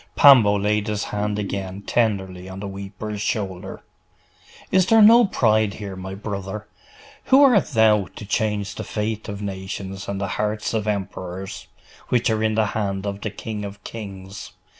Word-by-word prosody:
Pambo 115 -8 +7
laid 105 +1 0
his 105 -1 -1
hand 105 0 -2
again 100 -1 -4
tenderly 95 -6 -1
on 95 +1 -8
the 100 - -5
weeper's 100 +2 -6
shoulder. 95 -3 -3 0.9
'Is 185 -1 +4
there 225 - +6
no 230 +3 +8
pride 110 - +2
here, 100 -2 -6
my 95 +1 -6
brother? 100 0 -5 0.6
Who 270 +2 +6
art 245 -9 +5
thou, 110 -6 +4
to - - -8
change 105 -1 -1
the - - -6
fate 110 0 -3
of 100 0 -5
nations 95 0 -5
and 100 -1 -3
the 100 - -2
hearts 105 +1 -2
of 110 -2 -1
emperors, 95 -1 -4 0.4
which 120 -1 +2
are 110 0 0
in 110 -1 +1
the 110 0 +3
hand 100 -2 -2
of 100 0 -4
the 110 - -2
King 105 +1 -6
of 100 +1 -8
kings? 95 -3 -8
105 Hz, 165 wpm, -23 LUFS, 95-110 Hz, 0.9 s, no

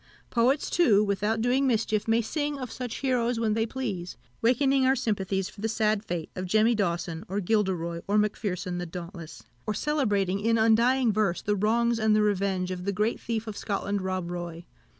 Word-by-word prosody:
Poets, 250 +5 +2
too, 220 -12 +4
without 210 +2 0
doing 260 +3 +2
mischief, 220 -3 0
may 225 +1 +3
sing 290 +4 -2
of 255 -4 -6
such 245 -3 -5
heroes 245 -3 +1
when 220 -2 +1
they 225 +1 0
please, 210 -9 -4 0.2
wakening 265 +3 +3
our 260 +1 +4
sympathies 195 -5 -1
for 205 - -12
the 225 - -1
sad 215 -2 +1
fate 175 -6 -4
of 185 0 -4
Jemmy 220 +5 +4
Dawson, 170 -4 -2
or 195 +2 -2
Gilderoy, 180 -5 0
or 205 +1 +2
Macpherson 195 -4 -1
the 175 - -4
Dauntless; 170 -6 -8 0.2
or 215 - -1
celebrating 205 -11 0
in 230 +2 +2
undying 230 +2 +4
verse 200 -4 0
the 210 - +1
wrongs 230 +3 +1
and 220 -1 +3
the 215 - +3
revenge 195 -3 0
of 180 0 -5
the 200 - +1
great 210 +4 0
thief 225 -1 -3
of 215 -2 -6
Scotland, 200 -1 -2
Rob 185 -2 -3
Roy. 175 -1 -6
210 Hz, 190 wpm, -27 LUFS, 190-230 Hz, 0.2 s, too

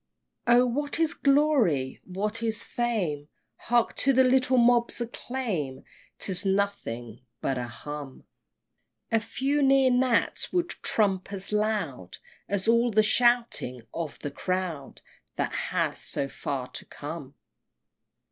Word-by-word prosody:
XIII. 240 - +7
Oh! 250 - +5
what 290 +6 -2
is 325 -2 +2
glory? 275 - +2
what 210 +5 -3
is 225 -2 -1
fame? 185 -12 -2 0.3
Hark 240 0 +1
to 275 - +3
the 260 +1 +5
little 255 0 +3
mob's 240 0 +4
acclaim, 225 - -4 0.3
'Tis 185 -2 +1
nothing 190 - -2 0.2
but 130 -2 -1
a 120 - -4
hum! 140 +3 -8 0.9
A 225 - +4
few 275 +6 -1
near 270 -1 +5
gnats 250 -1 +1
would 350 -1 0
trump 195 -3 0
as 195 +1 -4
loud 215 0 -1 0.3
As 200 0 -1
all 235 +1 +4
the 215 -1 +4
shouting 235 - +2
of 165 -3 -4
a 145 - -2
crowd 180 -4 -3 0.3
That - - -2 0.2
has - - -1
so 140 - -1
far 135 -2 -4
to - - -7
come! 145 -2 -8
215 Hz, 130 wpm, -27 LUFS, 150-245 Hz, 0.9 s, XIII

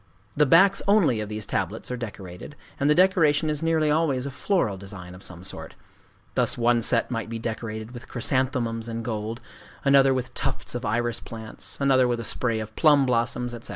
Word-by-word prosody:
The 150 0 +3
backs 195 +7 +5
only 190 - +4
of 105 -1 -4
these 105 -1 -4
tablets - - -3
are - - -1
decorated; 105 0 -8 0.2
and 140 - +2
the 150 - +5
decoration 165 -5 +3
is 150 - -2
nearly 160 -2 +2
always 150 -5 +1
a 140 - -4
floral 140 - 0
design 95 -2 -8
of 90 - -12
some 90 -2 -7
sort:—thus 95 - -4
one 120 0 +3
set 115 +2 +2
might 115 -3 -3
be 115 - -4
decorated 110 -1 -5
with 120 -1 -10
chrysanthemums 120 -2 -1
in 115 0 -4
gold, 110 +1 -4 0.4
another 140 -1 +5
with 125 -1 -2
tufts - - -2
of 120 0 -4
iris 120 +2 0
plants, 110 -1 -7
another 135 -2 +4
with 120 -1 -1
a - - -4
spray 115 -1 0
of 110 -1 -7
plum 145 -3 +5
blossoms, 120 0 0
etc. 120 -1 -7
120 Hz, 190 wpm, -25 LUFS, 110-140 Hz, 0.4 s, backs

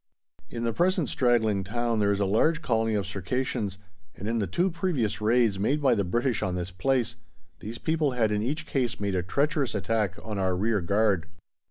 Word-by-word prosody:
In 115 -1 -5
the 115 -1 0
present 180 - +2
straggling 110 -6 +2
town 115 +3 -1
there 100 -1 +3
is 100 - 0
a 100 - +2
large 155 +12 +2
colony 115 -4 +1
of 100 -2 0
Circassians, 100 +1 -2 0.4
and 100 - -6
in 115 +1 0
the 100 - 0
two 175 - +1
previous 150 - -1
raids 110 -2 +3
made 135 +9 +1
by 135 -4 +4
the 100 -3 +1
British 120 +5 0
on 90 -1 -1
this 90 +1 -3
place 115 +4 0 0.4
these 110 +3 -7
people 155 -2 0
had 115 -3 +1
in 105 0 0
each 150 +8 -2
case 125 -5 -1
made 100 -1 -1
a 90 - +1
treacherous 140 - 0
attack 100 -1 0
on 105 -3 -4
our 95 -1 +1
rearguard. 100 -2 +1
110 Hz, 195 wpm, -27 LUFS, 100-130 Hz, 0.4 s, by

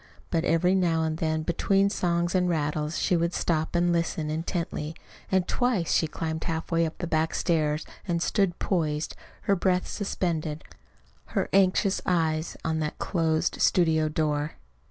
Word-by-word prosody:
But 165 -2 +1
every 180 +1 +3
now 170 -4 +2
and 160 0 -1
then, 160 -1 0
between 195 +4 +2
songs 175 -2 0
and 180 -1 +2
rattles, 150 -1 -1
she 180 - +2
would 170 +1 0
stop 160 0 0
and 175 0 +3
listen 165 -2 -1
intently; 160 -1 -3 0.4
and 190 -2 +2
twice 245 -9 +1
she 160 - +3
climbed 160 +1 -4
halfway 165 0 0
up 160 - -8
the 175 - -3
back 160 -1 0
stairs 155 -3 +1 0.2
and 170 -2 0
stood 180 0 +1
poised, 155 -5 -1 0.3
her 200 - +2
breath 180 0 +1
suspended, 165 -6 -2 0.7
her - - +1
anxious 195 0 +3
eyes 160 -2 0
on 160 0 0
that 150 -1 -3
closed 165 -1 0
studio 160 -3 +3
door. 150 -1 -1
165 Hz, 155 wpm, -27 LUFS, 155-180 Hz, 0.7 s, every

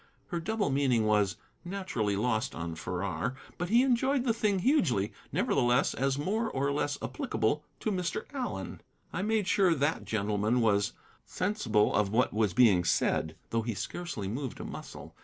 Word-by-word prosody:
Her 170 - -2
double 205 0 -1
meaning 130 -5 +2
was, 105 -1 +2 0.3
naturally, 175 - -2
lost 110 +3 0
on 80 0 -4
Farrar, 90 +6 -3 0.2
but 175 +1 -2
he 235 +4 +5
enjoyed 265 +1 +2
the 235 -3 +2
thing 210 -3 +1
hugely, 175 - +2 0.2
nevertheless, 120 0 +2
as 135 0 0
more 215 +10 0
or 140 -3 0
less 145 0 -1
applicable 130 +2 -1 0.2
to 215 - 0
Mr. 180 -3 -2
Allen. 260 -3 -4 0.3
I - - -1
made 215 -1 +1
sure 185 -3 +4
that 145 +2 0
gentleman 105 +2 0
was 105 -3 +2 0.3
sensible 135 - +1
of 105 -2 +2
what 120 +3 +2
was 105 -4 +1
being 105 -8 +5
said, 80 -1 +1 0.2
though 115 - +1
he 115 -1 -3
scarcely 170 - -4
moved 125 +5 -4
a - - -5
muscle. - - -8
130 Hz, 160 wpm, -30 LUFS, -, 0.3 s, he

